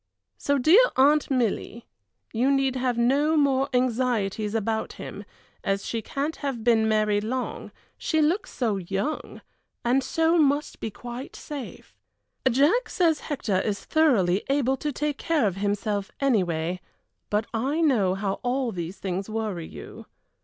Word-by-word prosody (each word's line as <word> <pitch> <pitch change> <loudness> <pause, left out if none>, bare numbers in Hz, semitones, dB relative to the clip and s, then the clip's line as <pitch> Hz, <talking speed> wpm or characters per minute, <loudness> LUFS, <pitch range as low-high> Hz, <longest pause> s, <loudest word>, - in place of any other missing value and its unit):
So, 285 0 +1
dear 325 - +6
Aunt 290 +3 +4
Milly, 235 -3 -1 0.5
you 245 +4 +2
need 270 -1 +2
have 250 -2 0
no 285 +6 +3
more 275 -2 +2
anxieties 230 -4 0
about 220 0 -1
him, - - -8 0.4
as 195 0 -1
she 230 - -2
can't 280 +8 -3
have 270 -6 -4
been 225 -2 +3
married 210 -1 +2
long, 250 +3 -4 0.3
she 315 - 0
looks 330 +7 +1
so 225 -6 -1
young, 195 - -4 0.4
and 255 +3 +3
so 325 +5 +2
must 290 0 +1
be 225 - -3
quite 245 +5 -8
safe. 285 -5 -8 0.5
Jack 290 - +3
says 330 -4 +2
Hector 220 - -1
is 205 -2 -3
thoroughly 215 - +3
able 270 -1 +2
to 295 +3 -2
take 290 +1 -2
care 320 -7 +1
of 195 -2 -1
himself, 205 0 -1
anyway, 180 - +1 0.5
but 210 +1 +1
I 265 +8 0
know 225 - +3
how 195 0 -2
all 250 0 0
these 175 -1 -5
things 190 +1 -4
worry 215 -7 -3
you. - - -11
245 Hz, 145 wpm, -25 LUFS, 205-285 Hz, 0.5 s, dear